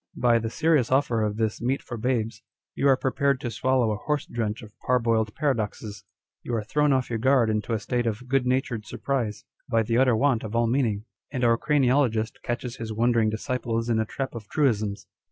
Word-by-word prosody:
By 120 -1 +4
the 115 0 -3
serious 150 -2 +2
offer 130 -4 +2
of 105 -1 -1
this 110 -1 -1
meat 130 +3 -1
for 120 - -6
babes, 115 -2 -1 0.3
you 140 - +1
arc 135 -1 +4
prepared 140 +1 +1
to 120 - -3
swallow 125 0 +1
a 105 - -2
horse 150 +6 -2
drench 115 0 -3
of 105 -1 -13
parboiled 115 -3 +1
paradoxes. 105 -7 -2 0.4
You 120 - -3
are 110 - -1
thrown 150 +7 +1
off 130 -2 +1
your 115 - -1
guard 125 -2 +3
into 105 +1 -2
a 110 - 0
state 120 +1 -1
of 115 +3 -3
good 130 -1 +1
natured 125 -5 -1
surprise, 115 -6 -3 0.2
by 115 -2 +2
the 115 +2 +1
utter 130 -3 +4
want 120 -1 +2
of 110 +1 -5
all 120 0 +3
meaning; 115 -4 0 0.2
and 125 - -3
our 115 -1 +5
craniologist 125 -5 +1
catches 120 0 -4
his 115 -1 -5
wondering 115 0 +2
disciples 115 0 -2
in 115 -1 +2
a 110 - +1
trap 135 +4 -4
of 110 -3 -8
truisms. 110 -9 0
115 Hz, 205 wpm, -26 LUFS, 110-130 Hz, 0.4 s, our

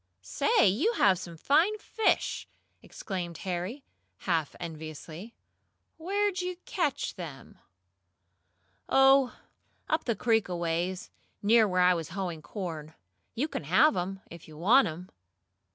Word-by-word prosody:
"Say, 230 - +3
you 275 - +2
have 195 - +3
some 170 -3 -9
fine 330 - +3
fish!" 435 +1 0 0.3
exclaimed 175 -4 -6
Harry, 185 +9 -3 0.4
half 165 -5 -1
enviously. 160 +5 -8 0.6
"Where'd 390 +3 0
you 360 0 -4
catch 305 -7 -1
them?" 150 - -10 1.3
"Oh, 270 -1 +5 0.5
up 315 +1 0
the 235 - 0
creek 225 -2 +1
aways 175 +1 -2 0.3
near 220 +1 +5
where 185 -1 +1
I 180 0 +6
was 165 -3 -4
hoeing 175 -3 -4
corn. 160 -4 -6 0.4
You 275 +7 0
can 160 - -5
have 250 - +4
'em, 190 +2 -3
if 170 -1 -11
you 155 -1 -13
want 230 - +5
'em." 175 +3 -7
190 Hz, 125 wpm, -29 LUFS, 170-270 Hz, 1.3 s, I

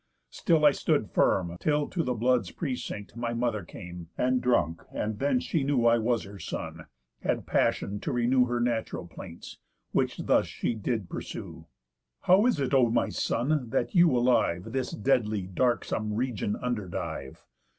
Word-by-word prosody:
Still 160 -4 +2
I 145 - +8
stood - - 0
firm, 85 -2 +2
till 150 -1 +1
to 180 - -1
the 125 -5 -1
blood's 125 +2 +2
precinct 125 -9 -5
My 120 0 -2
mother 115 -4 -1
came, 85 0 -9
and 125 0 +2
drunk; 85 -10 +1
and 105 0 -3
then 140 -2 +2
she 145 +3 -1
knew 135 -4 +1
I 115 0 +5
was 115 +1 +1
her 100 0 -10
son, - - -6 0.3
had - - -1
passion 100 +1 0
to - - -3
renew 125 +1 +3
Her 120 0 -1
natural 120 -2 -1
plaints, - - -10 0.3
which - - 0
thus - - +2
she - - -2
did 110 -2 -2
pursue: - - -7 0.5
'How 195 +6 +5
is 245 - +1
it, 135 0 -1
O 130 -3 +5
my 115 - +1
son, 135 -1 0
that 135 - -1
you 175 -2 +6
alive 115 -5 +2
This 130 0 -1
deadly 110 -5 +1
darksome 110 +1 0
region 115 -4 -1
underdive? 95 - -4
120 Hz, 160 wpm, -28 LUFS, 105-130 Hz, 0.5 s, I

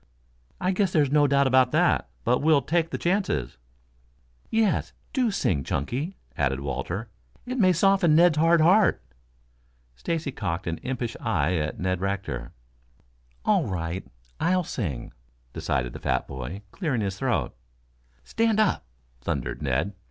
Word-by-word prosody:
"I 185 - +1
guess 190 -1 +1
there's 145 -5 +2
no 145 0 +5
doubt 140 0 +3
about 130 -1 +4
that. 70 - +2
But 125 - +2
we'll 150 -2 +4
take 165 0 +1
the - - -3
chances." 170 - -1 0.9
"Yes, 220 -2 +1 0.2
do 255 -4 +2
sing, 90 - 0
Chunky," 135 - -3 0.2
added 65 +1 0
Walter. 70 - -4 0.4
"It 255 +1 -3
may 185 -3 +5
soften 180 -2 +4
Ned's 165 -2 +5
hard 165 +1 +5
heart." 190 +6 +4 0.9
Stacy 160 - -2
cocked 95 -8 -3
an 80 -1 -3
impish 125 -3 -3
eye 90 -7 +1
at 75 0 -3
Ned 95 0 -1
Rector. 95 -11 -3 0.9
"All - - +3
right, 90 0 -3 0.4
I'll 180 +2 +2
sing," 80 - -4 0.4
decided 65 -3 -2
the - - -7
fat - - -1
boy, 65 +10 -6
clearing 145 - -1
his 95 -2 -3
throat. - - 0 0.7
"Stand 225 -1 +1
up," 205 - +1 0.3
thundered 70 -3 -3
Ned. 75 +8 0
125 Hz, 140 wpm, -26 LUFS, -, 0.9 s, no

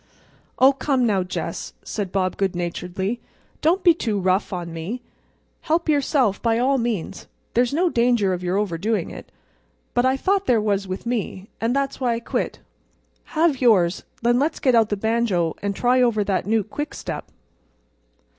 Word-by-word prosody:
"Oh, 265 +2 +6
come 270 -2 +1
now, 200 -4 +2
Jess," 180 +1 -4
said 200 -4 -4
Bob 185 -2 0
good 195 -2 -1
naturedly, 180 +5 -3 0.4
"don't 350 +5 +2
be 345 - +7
too 220 -10 -2
rough 185 +3 +1
on 175 -3 -4
me. 180 +10 -5 0.6
Help 335 +2 0
yourself, 280 -7 +2
by 230 -1 +2
all 265 +3 +2
means. 230 -7 -3 0.3
There's 245 0 +2
no 340 +6 +2
danger 235 - +2
of 180 - -3
your 180 +1 0
overdoing 205 +2 -1
it. - - -10 0.6
But 245 +1 +3
I 260 +1 +2
thought 390 +6 +1
there 235 -3 +4
was 200 -2 0
with 185 +4 -5
me; 215 -4 -3
and 230 +3 +1
that's 275 -1 -1
why 245 -3 +1
I - - -3
quit. 235 - -2 0.8
Have 310 -5 +3
yours, 195 -7 +4
and - - -23
then 240 +1 +3
let's 305 +4 0
get 255 - +3
out 225 -2 +4
the 205 - -1
banjo 215 -6 +1
and 200 -1 -2
try 250 +3 +3
over 230 -4 +3
that 195 -1 -1
new 220 0 +2
quickstep." 290 +9 -5
225 Hz, 175 wpm, -23 LUFS, 195-255 Hz, 0.8 s, be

